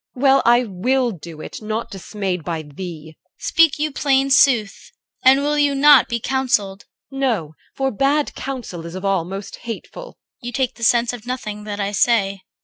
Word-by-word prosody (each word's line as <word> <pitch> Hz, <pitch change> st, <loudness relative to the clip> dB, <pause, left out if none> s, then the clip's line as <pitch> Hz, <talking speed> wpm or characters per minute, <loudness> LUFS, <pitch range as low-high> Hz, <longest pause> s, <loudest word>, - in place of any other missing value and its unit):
Well, 270 Hz, +1 st, +4 dB
I 240 Hz, +1 st, +5 dB
will 245 Hz, +5 st, 0 dB
do 165 Hz, -4 st, -10 dB
it, -, -, -8 dB
nought 215 Hz, +2 st, -4 dB
dismayed 195 Hz, -2 st, -4 dB
by 165 Hz, 0 st, -4 dB
thee. 160 Hz, 0 st, -9 dB
CHR. -, -, -24 dB
Speak 330 Hz, -3 st, +3 dB
you 305 Hz, +1 st, -1 dB
plain 275 Hz, -1 st, +1 dB
sooth? 250 Hz, -7 st, +3 dB, 0.3 s
and 265 Hz, +2 st, +6 dB
will 295 Hz, +1 st, +1 dB
you 285 Hz, -1 st, +2 dB
not 285 Hz, -1 st, +6 dB
be 235 Hz, -1 st, -1 dB
counselled? 220 Hz, -7 st, -1 dB, 0.3 s
EL. 270 Hz, -, -6 dB
No, 215 Hz, -, -1 dB, 0.2 s
for 270 Hz, 0 st, 0 dB
bad 280 Hz, +6 st, +1 dB
counsel 240 Hz, -11 st, -6 dB
is 170 Hz, -, -9 dB
of 185 Hz, +1 st, -6 dB
all 195 Hz, -4 st, +1 dB
most 195 Hz, +2 st, -7 dB
hateful. 240 Hz, -, -8 dB, 0.2 s
CHR. -, -, -13 dB
You -, -, -3 dB
take 260 Hz, 0 st, 0 dB
the 230 Hz, -, -11 dB
sense 235 Hz, +1 st, +3 dB
of 245 Hz, -1 st, -9 dB
nothing 210 Hz, -4 st, -5 dB
that 205 Hz, -1 st, -5 dB
I 200 Hz, 0 st, -1 dB
say. 200 Hz, -3 st, +1 dB
235 Hz, 190 wpm, -20 LUFS, 195-270 Hz, 0.3 s, and